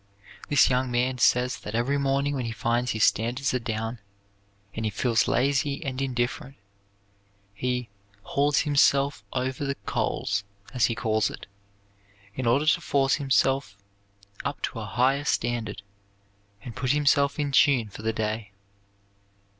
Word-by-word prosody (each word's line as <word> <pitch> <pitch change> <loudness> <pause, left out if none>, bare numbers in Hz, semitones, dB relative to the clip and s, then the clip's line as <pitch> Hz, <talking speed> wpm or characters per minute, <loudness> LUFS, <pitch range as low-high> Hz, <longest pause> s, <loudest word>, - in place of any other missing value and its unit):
This 145 -1 +5
young 130 0 +1
man 125 +1 0
says 125 +1 +3
that 105 - -6
every 135 +5 +1
morning 140 +1 0
when 130 -3 -2
he 115 - -3
finds 120 +3 -1
his 110 -2 0
standards 125 +5 +1
are 125 - +1
down 115 0 -4 0.7
and 110 - -4
he 110 - 0
feels 115 +3 +1
lazy 140 +3 0
and 135 -1 -3
indifferent 125 +1 -2 1.0
he 125 +3 -2 0.4
"hauls 145 +1 +1
himself 140 -4 +2
over 130 +2 -2
the 140 0 -1
coals," 105 +1 -1 0.3
as 125 - +3
he 115 - -2
calls 110 -2 +1
it, - - -9 0.9
in 130 +1 -3
order 135 +6 +3
to 155 - +3
force 135 -1 +1
himself 135 -4 +1 0.7
up 140 +1 -3
to 115 - -3
a 110 - -5
higher 130 +7 +1
standard 115 -7 -2 0.8
and 120 - -8
put 125 +1 0
himself 140 -1 +2
in 145 -2 -1
tune 135 -5 +4
for 105 - -10
the 110 +1 0
day. 110 -1 -3
125 Hz, 145 wpm, -26 LUFS, 115-140 Hz, 1.0 s, This